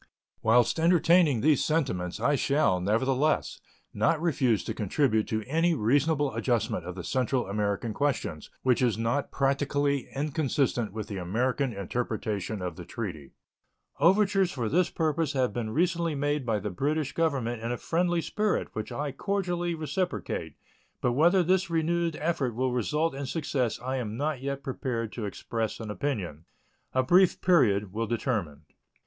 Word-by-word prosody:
Whilst 120 +5 +3
entertaining 165 -5 +4
these 150 -2 +3
sentiments, 115 - -1
I 145 - +2
shall, 140 -9 +2
nevertheless, 130 +9 +1 0.3
not 160 - +2
refuse 130 - +1
to - - -3
contribute 110 +1 +1
to 110 -1 -2
any 165 +7 +1
reasonable 145 +4 +2
adjustment 115 -3 -1
of 90 - -6
the 90 - -6
Central 130 +3 0
American 105 +2 -1
questions 130 - -2
which 125 -2 +3
is 120 -5 +2
not 115 +5 -1
practically 140 0 0
inconsistent 140 - 0
with 110 0 -5
the 100 - -5
American 125 +9 0
interpretation 105 -1 -3
of 90 -3 -4
the 90 - -7
treaty. 85 -7 -6 0.7
Overtures 195 +3 +4
for 120 -5 -2
this 175 +9 +2
purpose 155 -2 0
have 130 -6 +1
been 115 -1 -3
recently 170 +4 0
made 145 -1 -1
by 110 -2 +2
the 105 0 -4
British 145 - -1
Government 130 -8 0
in 115 +1 -3
a 120 - -2
friendly 175 +3 0
spirit, 210 -1 -1
which 110 - -5
I 145 0 -3
cordially 175 -2 -1
reciprocate, 160 - -3 0.4
but 125 - +1
whether 170 +8 +4
this 185 +1 +2
renewed 165 0 0
effort 150 -7 -1
will 130 +1 0
result 150 +7 0
in 135 0 -5
success 135 -5 -1
I 130 +2 -3
am 110 -3 -4
not 145 -1 -2
yet 140 0 -4
prepared 120 -4 -3
to 115 - -4
express 110 +2 -3
an 110 -2 -5
opinion. 100 - -3 0.5
A 130 - +2
brief 180 +7 +4
period 105 - +3
will 115 +1 -2
determine. 105 - -2
130 Hz, 155 wpm, -28 LUFS, 110-155 Hz, 0.7 s, entertaining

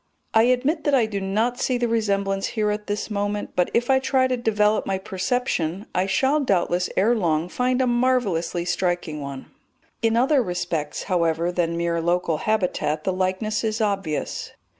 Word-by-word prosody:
I 220 +1 +5
admit 265 +6 +1
that 290 -2 +3
I 245 -4 +4
do 205 -2 -4
not 220 +6 0
see 255 -1 +1
the 240 0 0
resemblance 200 -3 0
here 210 -1 +2
at 210 0 -4
this 210 +1 -3
moment, 205 0 -2
but 180 - +2
if 240 +1 +1
I 265 -1 +4
try 265 0 +2
to 255 - 0
develop 215 -3 +2
my 195 - 0
perception 190 -2 -2
I 185 +1 +1
shall 270 +9 +2
doubtless 180 -7 +1
ere 225 +5 +4
long 165 -5 0
find 250 +3 +1
a - - +2
marvellously 240 -9 +1
striking 175 -4 -1
one. 140 -1 -7 0.5
In 225 0 +2
other 265 +3 +4
respects, 175 -6 -3
however, 170 -2 0
than 170 -1 -1
mere 170 0 0
local 170 -1 +1
habitat 180 -6 -1
the 190 - 0
likeness 190 +4 -1
is 220 0 -1
obvious. 195 -8 -2
205 Hz, 175 wpm, -23 LUFS, 175-240 Hz, 0.5 s, I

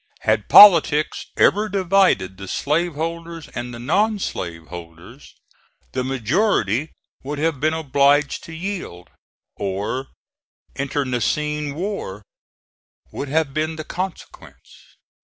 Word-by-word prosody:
Had 110 -1 0
politics 165 -6 +7
ever 210 +2 +3
divided 190 - +2
the 95 +1 -9
slave 160 - -1
holders 165 +1 -5
and 120 0 -6
the 120 - -8
non 205 - +1
slave 85 - -5
holders, 85 - -12 0.6
the 130 - -2
majority 135 - 0 0.3
would 145 +2 -5
have 155 -1 -1
been 155 +2 +1
obliged 145 -1 +2
to - - -10
yield, 170 - -6 0.5
or 100 +7 -3 0.7
internecine 145 +2 -2
war 200 +5 -5 0.9
would 145 - -5
have 150 -1 0
been 155 +2 -1
the 155 - -6
consequence. 185 +3 -9
150 Hz, 110 wpm, -21 LUFS, 120-170 Hz, 0.9 s, politics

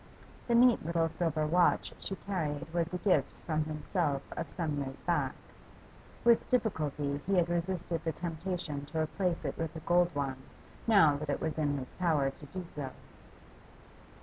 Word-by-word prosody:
The 235 - +3
neat 245 0 +6
little 165 0 +1
silver 160 -2 0
watch 175 +3 +3
she 195 - -4
carried 160 -6 -3
was 170 0 0
a 180 - -1
gift 185 +1 +2
from 155 -2 0
himself 155 -2 -1
of - - -4
some 155 -5 -2
years 135 0 -5
back; 145 -7 +1 0.9
with 235 -1 +4
difficulty 150 - 0
he 195 - +3
had 175 -2 +3
resisted 175 -1 -1
the 165 - 0
temptation 165 -3 -4
to 155 +2 -5
replace 175 +2 -1
it - - -3
with 165 -1 -3
a - - -4
gold 175 +1 +4
one 135 -2 -1 0.5
now 160 -10 +6
that 150 0 -5
it 140 - 0
was 160 -1 -2
in 145 -2 +1
his 130 -2 -7
power 155 -6 +2
to 145 - -13
do 180 +5 -6
so. 140 -3 -3
165 Hz, 170 wpm, -32 LUFS, 145-180 Hz, 0.9 s, neat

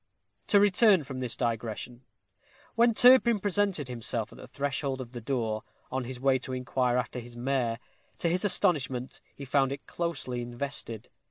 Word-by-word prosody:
To 205 - +5
return 200 -2 +5
from 130 -1 -7
this 125 -2 -2
digression. 120 +1 -3 0.7
When 235 0 +3
Turpin 245 -3 +6
presented 195 -6 0
himself 120 -3 -3
at - - -14
the - - -10
threshold 140 -1 -2
of 125 -2 -7
the 120 -2 -7
door, 115 -3 -1 0.3
on 130 -1 -2
his 125 0 -7
way 135 0 +3
to 130 - -6
inquire 125 -1 0
after 125 0 -2
his 120 0 -11
mare, 120 -2 0 0.4
to - - -1
his 180 +2 0
astonishment 135 -10 +1
he 140 - -8
found 135 0 +2
it 140 - -6
closely 140 -8 -3
invested. 120 -2 -5
130 Hz, 165 wpm, -29 LUFS, 120-170 Hz, 0.7 s, Turpin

